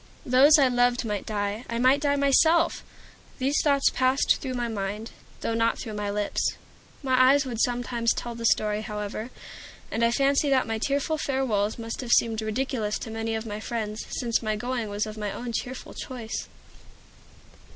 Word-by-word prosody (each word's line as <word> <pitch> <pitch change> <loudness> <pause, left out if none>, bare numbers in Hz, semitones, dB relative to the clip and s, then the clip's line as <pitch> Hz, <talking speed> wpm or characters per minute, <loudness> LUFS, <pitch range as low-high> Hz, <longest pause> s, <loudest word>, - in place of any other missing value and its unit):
Those 275 +5 +6
I 275 -3 +5
loved 245 0 +2
might 210 -2 -3
die; 205 +1 -2
I 235 - -2
might 260 +4 +4
die 285 -1 +2
myself. 315 +4 +3 0.5
These 275 +2 +1
thoughts 280 -2 +3
passed 260 +2 +2
through 260 -2 -5
my 240 -1 -1
mind, 210 0 -4 0.3
though 230 - -1
not 230 0 +1
through 220 - -6
my 205 -1 -3
lips. 205 0 -1 0.5
My 255 -1 +5
eyes 285 0 +3
would 235 -3 -3
sometimes 240 -1 0
tell 240 - -3
the 230 0 -1
story, 210 -1 +1
however, 210 +1 -5 0.6
and 230 - 0
I 230 - +5
fancy 275 +3 +2
that 265 -2 +3
my 225 -1 -3
tearful 285 +5 0
farewells 240 -8 0
must 230 +1 -5
have 240 -2 +1
seemed 225 -1 +3
ridiculous 220 -1 -2
to 225 - -7
many 225 0 -2
of 220 +1 -4
my 210 -1 -5
friends, 220 -1 -4
since 235 -3 0
my 215 -2 -1
going 240 0 -3
was 205 +1 -1
of 215 0 -8
my 210 -1 -2
own 240 +3 -5
cheerful 250 +2 -5
choice. 240 -4 -6
235 Hz, 180 wpm, -26 LUFS, 215-260 Hz, 0.6 s, Those